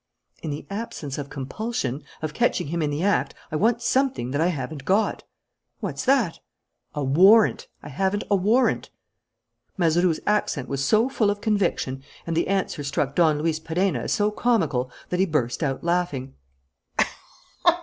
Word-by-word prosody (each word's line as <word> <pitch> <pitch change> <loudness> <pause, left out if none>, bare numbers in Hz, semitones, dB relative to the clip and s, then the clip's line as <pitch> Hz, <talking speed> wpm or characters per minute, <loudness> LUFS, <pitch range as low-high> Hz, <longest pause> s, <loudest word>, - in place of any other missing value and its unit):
"In 160 - -4
the 145 0 -5
absence 180 -10 -5
of 140 -1 -5
compulsion, 140 - -3 0.2
of 155 -1 -2
catching 145 - +1
him 170 +1 -1
in 150 - +1
the 145 +4 -2
act, 205 +1 +1 0.2
I - - -2
want 235 +7 +2
something 260 - +1
that 145 +3 0
I 165 - +3
haven't 145 -3 -4
got." 200 +8 +1 0.6
"What's - - -4
that?" 255 -10 +2 0.6
"A 145 - -1
warrant. 190 +11 +5 0.2
I 145 - -8
haven't 190 +8 0
a - - +6
warrant." 215 +7 +2 0.9
Mazeroux's 170 -1 +2
accent 205 -10 0
was 140 0 -2
so 215 - +4
full 230 -6 +1
of 205 0 -1
conviction, 195 - 0 0.2
and 165 - -2
the 170 - +1
answer 190 -6 -1
struck 140 0 -1
Don 155 -3 +3
Luis 160 -1 0
Perenna 175 +4 0
as - - -3
so 210 0 +2
comical, 160 - +1 0.2
that 180 - -1
he 190 - +4
burst 145 -6 -1
out 135 -4 -1
laughing. 170 -7 -1
170 Hz, 160 wpm, -24 LUFS, 145-205 Hz, 0.9 s, a